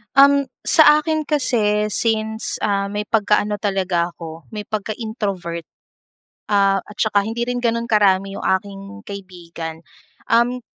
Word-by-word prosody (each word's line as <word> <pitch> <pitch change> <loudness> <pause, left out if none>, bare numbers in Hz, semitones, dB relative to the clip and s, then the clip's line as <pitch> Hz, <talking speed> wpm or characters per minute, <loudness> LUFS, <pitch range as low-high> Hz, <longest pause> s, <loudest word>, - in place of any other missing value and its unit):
Um, 280 0 +6 0.2
sa 305 -1 +6
akin 310 -1 -2
kasi, 215 -8 +1
since, 220 0 -1
ah, 200 -1 +1
may 205 +1 -3
pagkaano 210 -1 +1
talaga 190 -4 0
ako, 165 -1 -10
may 210 -1 -4
pagka-introvert. 205 -5 -4 0.8
Ah, 195 -1 +3
at 210 - -13
saka 205 -2 +2
hindi 235 +2 -2
rin 245 0 -1
gano'n 235 0 -1
karami 195 -2 +3
'yong - - -6
aking 195 +1 -1 0.3
kaibigan. 170 -4 -8 0.5
Um, 240 +2 +3
210 Hz, 130 wpm, -20 LUFS, 195-230 Hz, 0.8 s, Um